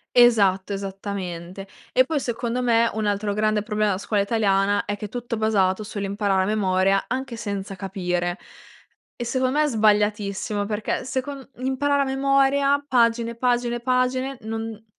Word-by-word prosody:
Esatto, 205 -6 +4
esattamente. 195 -2 -5 0.2
E 255 - +5
poi 300 +3 -1
secondo 240 -1 -2
me, 235 -1 +3
un 215 -1 -1
altro 205 0 0
grande 215 0 +1
problema 210 -1 0
la 185 - -2
scuola 205 0 0
italiana, 200 -1 +1
è 205 - -3
che 205 - -8
è - - -4
tutto 240 +1 -4
basato 210 -2 +1
sull'imparare 200 -1 -1
a - - 0
memoria, 195 -2 +2
anche 260 -1 -4
senza 200 -3 -5
capire. 180 -2 -2 0.8
E 240 - -5
secon 255 +2 0
me 300 - +3
è - - +2
sbagliatissimo, 210 -3 +1
perché 210 0 -2
secon 265 +1 -4
imparare 280 +2 +1
a - - +1
memoria 275 +1 +2
pagine, 235 -2 +2
pagine, 240 -1 0
pagine, 255 +2 0
non 225 0 -5
215 Hz, 150 wpm, -23 LUFS, 200-250 Hz, 0.8 s, E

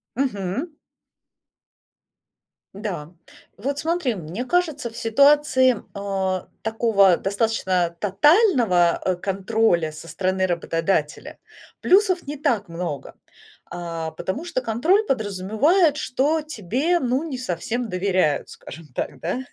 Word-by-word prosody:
Мгм. 250 - -2 2.0
Да. 185 -7 -5 0.5
Вот 275 +8 -3
смотри, 320 -5 0
мне 185 +5 -6
кажется 315 -6 0
в 230 - -12
ситуации, 260 +1 +4 0.2
э, 190 -2 -2 0.2
такого 220 -5 +3
достаточно 190 -4 0
тотального, 210 - +3
э, 185 - +1
контроля 195 -2 0
со 155 +2 -11
стороны 185 +1 0
работодателя, 165 -2 -2 0.4
плюсов 370 -4 +3
не 295 +1 -5
так 235 - 0
много, 165 -4 -5 0.6
а, 165 -2 -5
потому 230 - -4
что 300 -7 -2
контроль 265 - +2
подразумевает, 240 - +2
что 300 +3 0
тебе, 295 - -1
ну, 260 +1 0
не 285 -6 -5
совсем 235 +2 -3
доверяют, 185 -6 0
скажем 165 +4 -11
так, - - -4
да. 180 +9 -2
220 Hz, 110 wpm, -23 LUFS, 185-275 Hz, 2.0 s, ситуации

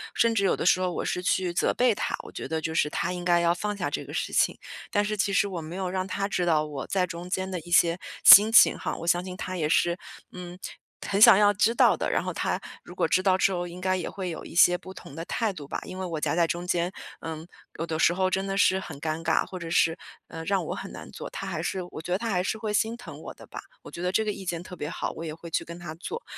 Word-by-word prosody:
甚 230 0 +3
至 210 -3 +1
有 195 - +3
的 - - -4
时 180 +1 +4
候 180 -1 0
我 - - -3
是 180 - -2
去 180 -1 0
责 - - +1
备 245 -2 +3
他， 205 - -2
我 - - -11
觉 - - -6
得 160 - -2
就 160 - -3
是 150 -2 +2
他 180 - -2
应 180 -1 -5
该 175 -1 +3
要 170 0 +3
放 210 +3 -3
下 - - -2
这 - - -3
个 - - -10
事 - - -3
情。 - - +2 0.3
但 205 0 +1
是 215 +1 -2
其 200 -1 0
实 200 - +2
我 180 -4 -5
没 160 +2 -8
有 190 -1 -2
让 185 0 -2
他 195 +1 -2
知 180 -3 -1
道， 155 -3 +2
我 145 -3 -6
在 190 -2 +1
中 175 +1 -8
间 190 0 -2
的 185 -2 -3
一 170 - -13
些 175 0 +4 0.2
心 210 +3 +10
情 225 - +7
哈， - - -3
我 170 - -7
相 175 +1 +2
信 185 0 -7
他 185 - -5
也 155 -4 -1
是， 170 +2 +2 0.3
嗯， 180 -1 -9 0.5
很 200 +1 0
想 195 - +10
要 205 0 +5
知 215 +3 +2
道 - - +5
的， - - -1
然 - - +1
后 - - -3
他 - - -1 0.2
如 - - -12
果 - - +1
知 185 - +2
道 185 -1 +3
之 195 - +3
后， 175 -1 -2
应 175 +1 -9
该 185 0 +1
也 180 - -4
会 190 -2 -5
有 165 - -7
一 - - -11
些 180 +1 +6
不 190 +1 -11
同 140 - -12
的 165 +2 -6
态 225 +1 -1
度 150 -7 -9
吧。 - - -4
因 185 - -8
为 190 - -3
我 165 -4 -4
夹 - - 0
在 170 -1 +3
中 175 +2 -3
间， 175 0 0 0.3
嗯， 160 0 -6 0.3
有 165 - -1
的 160 -1 -3
时 170 - +4
候 185 +1 +1
真 190 +1 -1
的 195 0 -2
是 190 -1 +4
很 190 - -8
尴 155 +1 -2
尬， 165 -1 +1
或 185 - -8
者 165 -1 -6
是， 165 0 +2 0.3
呃， 165 0 -7
让 195 0 0
我 - - -3
很 - - -7
难 - - -10
做， - - -7
他 - - -6
还 - - -3
是 190 - -2
我 - - -7
觉 175 - -7
得 - - +2
他 230 +2 -4
还 180 -4 +1
是 200 +4 -2
会 215 -1 -3
心 220 +2 +1
疼 245 +1 -10
我 - - -8
的 - - -14
吧， - - -8 0.2
我 - - -12
觉 170 - -7
得 180 0 0
这 220 - +2
个 215 - -1
意 195 -1 -8
见 170 -1 -3
特 180 - -10
别 150 - -4
好， - - -3
我 165 - -7
也 155 -1 -5
会 170 +1 -10
去 165 - -1
跟 170 0 -9
他 170 -3 -7
做。 455 - -6
180 Hz, 325 characters per minute, -26 LUFS, 170-195 Hz, 0.5 s, 心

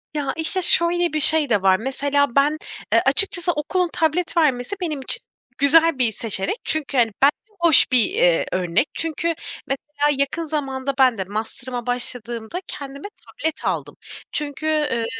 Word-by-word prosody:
Ya, 290 -2 -2
işte, 325 +4 +4
şöyle 345 0 +3
bir 310 - 0
şey 310 0 +6
de 210 -4 +2
var. 190 -1 +4
Mesela 280 +2 -1
ben, 290 +2 +3 0.4
eee, - - +5
açıkçası 375 -4 +2
okulun 345 +3 -1
tablet 330 +2 -1
vermesi, 275 0 +1
benim 305 -6 -3
için 455 - -1 0.3
güzel 320 +1 +4
bir 240 -3 +2
seçenek. 215 - -2
Çünkü 295 -3 -3
hani, 230 -2 +3
bence 280 +2 +5 0.3
hoş 335 -6 +4
bir, 250 -3 +5
eee, 175 -2 +2
örnek. 185 - 0
Çünkü 325 0 -3 0.4
mesela 290 +1 -1
yakın 280 +4 -1
zamanda, 275 -3 -3
ben 255 -3 +4
de 190 - -2
masterıma 240 +5 -6
başladığımda, 240 +2 -3
kendime 280 +4 -8 0.2
tablet 320 -10 -5
aldım. - - -3 0.4
Çünkü, 295 0 -4
eee, 295 -7 0
285 Hz, 155 wpm, -21 LUFS, 245-320 Hz, 0.4 s, şey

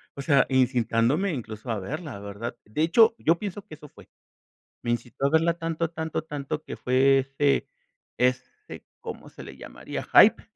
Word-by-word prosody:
o 140 - -6
sea, 140 -1 +4
incitándome 130 - +1
incluso 110 -3 -7
a 110 - -2
verla, 140 - -6
¿verdad?, 100 +4 -6
de 105 +9 -2
hecho, 220 +7 +5
yo 165 -6 +2
pienso 205 0 -6
que 160 - -13
eso 150 -1 -14
fue. - - -18 0.7
Me 120 - -2
incitó 120 +3 -2
a - - +1
verla 165 +2 +3
tanto, 165 -1 -3
tanto, 160 -1 -3
tanto 150 0 -5
que - - -6
fue 135 +2 +3
ese 135 +1 0 0.5
ese, 130 - -2 0.2
¿cómo 465 -1 -8
se - - -12
le - - -11
llamaría?, - - -7
hype - - +7
140 Hz, 170 wpm, -26 LUFS, 125-165 Hz, 0.7 s, hype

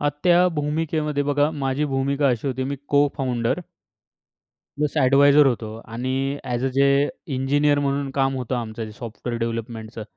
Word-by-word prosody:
अ, 145 - +2 0.2
त्या 175 0 +5
भूमिकेमध्ये 150 0 -1
बघा 145 +1 +1
माझी 135 +2 0
भूमिका 140 +1 +1
अशी 120 +1 -1
होती 130 0 -2
मी 140 +1 -3
को-फाउंडर 135 -2 +1 1.2
प्लस 150 +1 -1
एडवायझर 140 +1 +5
होतो. 115 -4 0 0.2
आणि 125 +2 -3 0.3
ॲज 125 0 -2
अ, 135 - +2
जे 140 +1 +3 0.3
इंजिनिअर 145 +2 +2
म्हणून 140 -1 -1
काम 135 0 +2
होतं 125 0 -3
आमचं 115 -1 -4
जे 110 - -9
सॉफ्टवेअर 115 +1 -6
डेव्हलपमेंटचं. 115 -1 -4
135 Hz, 150 wpm, -23 LUFS, 120-145 Hz, 1.2 s, त्या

